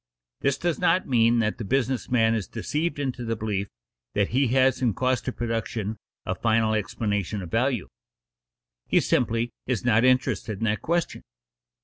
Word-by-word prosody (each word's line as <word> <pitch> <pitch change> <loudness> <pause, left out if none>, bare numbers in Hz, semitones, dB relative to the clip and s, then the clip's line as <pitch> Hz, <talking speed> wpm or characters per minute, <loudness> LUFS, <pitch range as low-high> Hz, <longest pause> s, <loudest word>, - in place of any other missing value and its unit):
This 135 -1 +1
does 170 0 -1
not 180 +1 +2
mean 120 -2 +4
that 110 0 -1
the - - -3
business 130 0 0
man 115 -2 +3
is 110 -4 -2
deceived 160 +3 -2
into 130 -3 -3
the 115 -1 -1
belief 105 -2 -2 0.5
that 100 -1 +2
he 135 +2 +2
has 130 +2 +3
in 120 -5 +1
cost 130 0 0
of 130 - -2
production 115 -2 -3 0.3
a - - -1
final 110 -1 +2
explanation 105 -1 -1
of 85 - -9
value. 120 -3 +1 1.0
He - - +4
simply 115 0 +1 0.2
is 125 -3 -1
not 115 -1 +4
interested 125 -5 +2
in 115 - -5
that 110 -1 0
question. 170 0 -1
115 Hz, 165 wpm, -25 LUFS, 110-130 Hz, 1.0 s, mean